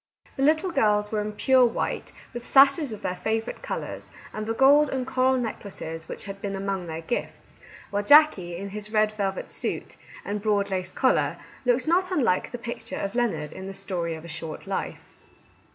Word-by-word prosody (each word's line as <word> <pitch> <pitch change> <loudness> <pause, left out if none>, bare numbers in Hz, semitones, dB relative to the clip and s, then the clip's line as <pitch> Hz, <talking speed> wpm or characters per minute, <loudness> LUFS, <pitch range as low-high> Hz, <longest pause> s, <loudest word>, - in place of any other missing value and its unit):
The - - -4
little 315 +6 +3
girls 210 -7 +2
were 215 -1 0
in 210 0 -4
pure 260 +4 +4
white, 235 -2 -1 0.2
with 240 0 -6
sashes 275 +1 +5
of 215 - -8
their 180 - -1
favourite 220 +5 -2
colours, - - -5 0.2
and 215 0 -4
the 225 - 0
gold 285 +3 +6
and 260 -1 -2
coral 260 0 +2
necklaces 190 -8 -5
which - - -6
had 195 0 -8
been 200 -1 -3
among 195 -2 -3
their 160 0 -5
gifts; 205 +9 -5 0.3
while 205 0 0
Jackie, 205 - +5
in 200 +3 -5
his 210 +1 -7
red 215 -1 +3
velvet 200 -2 -2
suit - - -4 0.3
and 205 0 -3
broad 200 -2 +1
lace 185 -1 -2
collar, 260 +5 +2 0.3
looked 250 +3 +2
not 365 +3 +3
unlike 240 - +1
the 245 - -4
picture 235 -1 -6
of 200 0 -3
Leonard 200 -12 -1
in 190 - -8
cc - - -6
The 195 - -6
Story 170 -4 -3
of 160 +1 -10
a - - -8
Short 160 0 -7
Life." 195 -1 -4
210 Hz, 195 wpm, -26 LUFS, 195-255 Hz, 0.3 s, gold